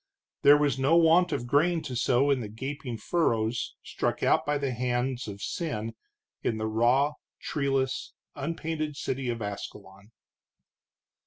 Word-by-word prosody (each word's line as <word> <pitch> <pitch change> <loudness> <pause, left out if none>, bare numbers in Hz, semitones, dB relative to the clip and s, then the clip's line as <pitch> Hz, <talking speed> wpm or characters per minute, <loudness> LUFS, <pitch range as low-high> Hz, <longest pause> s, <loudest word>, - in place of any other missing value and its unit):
There 145 +1 +8
was 145 -3 +1
no 140 +5 +4
want 170 +2 +5
of 120 - -2
grain 160 +6 +2
to 130 - -5
sow 130 +3 +3
in 135 - +2
the 115 - -4
gaping 130 +2 -5
furrows 115 -4 0
struck - - -2
out - - +3
by 145 0 +2
the 140 -2 -1
hands 125 +1 -1
of 100 0 -7
sin 115 -9 -3 0.5
in 110 - -1
the 110 - -2
raw, 120 +7 +3 0.3
treeless, 135 -2 -1 0.2
unpainted 155 -1 -3
city 130 -2 -2
of 115 -2 -3
Ascalon. 100 0 -8
130 Hz, 145 wpm, -28 LUFS, 115-145 Hz, 0.5 s, There